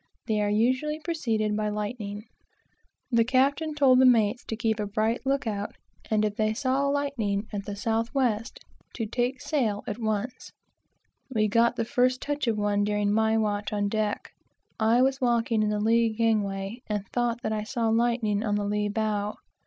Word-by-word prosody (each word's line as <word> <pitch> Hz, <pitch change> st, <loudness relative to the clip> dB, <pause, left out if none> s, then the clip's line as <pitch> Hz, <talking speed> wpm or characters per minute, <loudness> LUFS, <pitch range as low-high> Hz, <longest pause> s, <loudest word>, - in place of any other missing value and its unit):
They 215 Hz, -2 st, 0 dB
are 205 Hz, -, +1 dB
usually 255 Hz, +8 st, +1 dB
preceded 225 Hz, -11 st, -1 dB
by 210 Hz, 0 st, -1 dB
lightning. 210 Hz, 0 st, -4 dB, 0.9 s
The 230 Hz, -1 st, +4 dB
captain 275 Hz, +5 st, +1 dB
told 265 Hz, -3 st, +5 dB
the 260 Hz, -, +6 dB
mates 230 Hz, -1 st, +3 dB
to 225 Hz, -, -4 dB
keep 220 Hz, -1 st, -1 dB
a 210 Hz, -, -1 dB
bright 220 Hz, +5 st, -1 dB
look 275 Hz, -1 st, +1 dB
out, 205 Hz, -2 st, -3 dB, 0.3 s
and 215 Hz, -1 st, +2 dB
if 210 Hz, -1 st, -3 dB
they 215 Hz, 0 st, +1 dB
saw 270 Hz, +2 st, +1 dB
lightning 270 Hz, -8 st, -1 dB
at 200 Hz, -1 st, -4 dB
the 205 Hz, -, -5 dB
south 225 Hz, +2 st, -1 dB
west, 245 Hz, -4 st, -1 dB, 0.3 s
to 225 Hz, -, -2 dB
take 245 Hz, +4 st, -1 dB
in -, -, -26 dB
sail 230 Hz, -10 st, -1 dB
at 210 Hz, +2 st, -5 dB
once. 220 Hz, +3 st, -3 dB, 0.8 s
We 215 Hz, -4 st, +1 dB
got 235 Hz, +3 st, +3 dB
the 230 Hz, -, -1 dB
first 255 Hz, 0 st, +2 dB
touch 290 Hz, -1 st, -3 dB
of 225 Hz, -2 st, +1 dB
one 205 Hz, 0 st, +1 dB
during 205 Hz, 0 st, +1 dB
my 220 Hz, +1 st, +2 dB
watch 210 Hz, -1 st, -1 dB
on 205 Hz, -1 st, 0 dB
deck. 215 Hz, -1 st, -2 dB, 0.5 s
I 230 Hz, +3 st, +4 dB
was 270 Hz, 0 st, +1 dB
walking 235 Hz, -2 st, +2 dB
in 210 Hz, -, +1 dB
the 210 Hz, 0 st, -1 dB
lee 230 Hz, +2 st, +3 dB
gangway, 215 Hz, -1 st, -1 dB
and 205 Hz, -2 st, -3 dB
thought 240 Hz, 0 st, 0 dB
that 220 Hz, -, -1 dB
I 215 Hz, -, -1 dB
saw 225 Hz, +1 st, -1 dB
lightning 225 Hz, -2 st, +1 dB
on 210 Hz, -2 st, 0 dB
the 205 Hz, 0 st, -1 dB
lee 210 Hz, 0 st, 0 dB
bow. 210 Hz, -1 st, -1 dB
220 Hz, 185 wpm, -27 LUFS, 210-245 Hz, 0.9 s, the